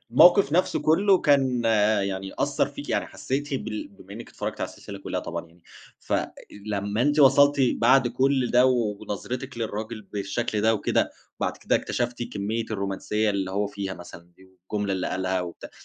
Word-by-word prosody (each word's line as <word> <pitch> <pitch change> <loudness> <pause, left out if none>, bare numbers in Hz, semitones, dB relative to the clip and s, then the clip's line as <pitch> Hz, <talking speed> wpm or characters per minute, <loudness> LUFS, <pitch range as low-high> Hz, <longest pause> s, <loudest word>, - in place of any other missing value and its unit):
الموقف 175 - +6
نفسه 180 +3 +2
كله 190 +5 +4
كان 130 -5 +2 0.4
يعني 95 0 -4
أثَّر - - +1
فيكِ - - -9
يعني، - - 0
حسيتِ 140 +2 -3
بال 110 -4 -4
بما 100 0 -15
إنِّك 115 +3 -9
اتفرجتِ - - -5
على - - -1
السلسلة - - -10
كلها - - -4
طبعًا 85 0 -5
يعني، 85 +1 -24 0.4
فلمّا 105 +1 -3
أنتِ 145 +3 +2
وصلتِ 140 +1 +6
بعد 125 +2 +4
كل 130 +1 +1
ده 125 +1 +5
ونظرتِك 120 +1 -2
للراجل 110 0 -4
بالشكل 105 +2 -3
ده 110 +1 +3
وكده، 105 - 0 0.3
وبعد - - -1
كده - - +1
اكتشفتِ 120 0 -2
كمية 110 +1 -3
الرومانسية 105 +1 -1
اللي 95 -2 -2
هو 100 +2 0
فيها 100 -2 -5
مثلًا 85 -1 -13
دي 95 - -18
والجملة 95 +2 -4
اللي 95 -1 -1
قالها 95 0 -1
وبتاع، 90 -1 -8
110 Hz, 165 wpm, -25 LUFS, 100-130 Hz, 0.4 s, الموقف